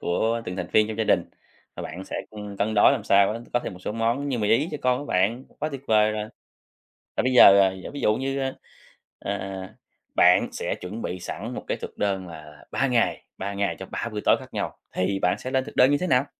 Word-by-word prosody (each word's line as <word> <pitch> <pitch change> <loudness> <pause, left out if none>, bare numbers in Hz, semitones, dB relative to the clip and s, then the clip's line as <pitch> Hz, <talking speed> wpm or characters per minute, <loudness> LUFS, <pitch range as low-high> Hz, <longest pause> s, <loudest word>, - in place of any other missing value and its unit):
của 115 +6 0
từng 90 - -5
thành - - -3
viên 110 0 +4
trong 110 - -4
gia 110 - +1
đình - - +3 0.5
và - - -5
bạn 90 +5 -7
sẽ, - - -5
ừm, 105 -2 -8
cân 110 +2 0
đối 105 - +6
làm 115 -7 -2
sao 100 0 +4
á 115 - -5
có 120 - +2
thêm - - -5
một 90 - -11
số 100 - -4
món 115 +5 0
như 125 - -1
mì 105 -2 0
Ý 145 +9 +3
cho 150 - -4
con 125 0 +2
của 145 - -6
bạn, 110 +7 +1
quá 155 - -1
tuyệt 140 -3 -6
vời 110 -1 +4
rồi. 105 0 -3 0.9
Và - - +2
bây 130 0 +1
giờ, 100 -5 +9
à, 95 -1 +4 0.2
ví 145 - -5
dụ 105 - +2
như, 135 +1 -2
a, 135 -1 -1 0.7
à, 95 -1 -5 0.4
bạn 90 0 +5
sẽ - - -3
chuẩn 105 +6 -6
bị 90 - -4
sẵn 100 +7 -6
một - - -6
cái - - -1
thực - - -8
đơn 95 -3 -1
là 75 -2 -12
3 135 - +1
ngày, 120 -2 +1
3 100 +1 -4
ngày 100 0 -1
cho - - -6
3 - - -4
bữa - - -4
tối - - +5
khác - - -13
nhau, - - -3 0.2
thì 95 +1 0
bạn 90 - +1
sẽ 130 - -5
lên 130 -1 +1
thực - - -10
đơn 130 +3 +6
như 145 - +4
thế 185 - -2
nào? 130 -2 +3
105 Hz, 255 wpm, -25 LUFS, 95-125 Hz, 0.9 s, giờ